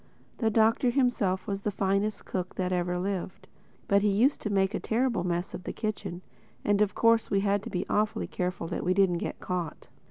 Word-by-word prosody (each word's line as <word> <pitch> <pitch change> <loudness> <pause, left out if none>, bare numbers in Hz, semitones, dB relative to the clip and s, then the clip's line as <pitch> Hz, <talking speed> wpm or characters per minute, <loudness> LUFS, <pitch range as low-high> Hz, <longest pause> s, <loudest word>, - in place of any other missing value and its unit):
The 225 - +2
Doctor 225 +3 +3
himself 240 -8 +1
was 200 -2 -3
the 210 - -1
finest 200 +1 0
cook 185 -1 -4
that 185 0 -1
ever 180 0 0
lived. 185 0 -4 0.4
But 200 0 +4
he 210 - +2
used 230 +9 +3
to 215 - -2
make 195 0 +2
a - - -1
terrible 235 -4 0
mess 175 0 -2
of - - -6
the - - -5
kitchen; 200 -5 -4 0.4
and 205 0 +3
of 210 -1 +2
course 230 -1 +3
we 195 - +2
had 200 0 +1
to - - -7
be 180 0 -2
awfully 210 0 0
careful 180 -1 -3
that 175 - -3
we 185 +1 +1
didn't 185 -3 +3
get - - -4
caught. 175 -4 -4
195 Hz, 210 wpm, -28 LUFS, 180-215 Hz, 0.4 s, But